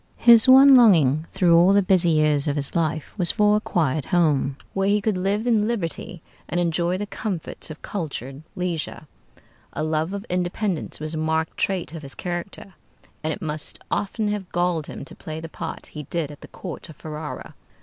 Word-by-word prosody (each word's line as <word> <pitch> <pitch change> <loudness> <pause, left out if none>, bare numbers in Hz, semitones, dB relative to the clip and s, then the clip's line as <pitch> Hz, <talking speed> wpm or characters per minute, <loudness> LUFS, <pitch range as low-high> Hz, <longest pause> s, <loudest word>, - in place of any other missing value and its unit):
His 235 -1 +7
one 270 +1 +9
longing 165 - +5
through 175 -2 +4
all 175 +3 +6
the 200 0 +4
busy 185 -2 +3
years 150 -2 +2
of 145 - 0
his 145 +2 -3
life 160 -2 -1
was 175 - +1
for 210 0 +3
a - - -2
quiet 155 -8 0
home, 145 -6 +1 0.2
where 195 0 0
he 205 +1 +3
could 210 0 0
live 195 +4 -1
in 220 -3 +2
liberty 180 -5 -4 0.3
and 175 - 0
enjoy 175 +1 0
the 205 - -3
comforts 195 -6 -4
of 155 - -10
cultured 140 - -5
leisure. 175 -4 -3 0.7
A - - -3
love 155 +2 -1
of 200 +1 -5
independence 180 0 -2
was 155 +1 -5
a - - -3
marked 160 0 -1
trait 185 -4 -2
of 165 - -7
his 140 -2 -9
character, 180 +2 -6 0.5
and 155 - -1
it 200 - -5
must 150 -1 -4
often 210 +1 -1
have 205 -3 -4
galled 175 -3 0
him - - -8
to - - -10
play 155 0 -7
the 165 - -7
part 165 0 -7
he 150 - -8
did 150 +1 -3
at 145 - -13
the - - -10
court 175 -2 -8
of 160 - -11
Ferrara. 150 +1 -7
170 Hz, 195 wpm, -23 LUFS, 155-195 Hz, 0.7 s, one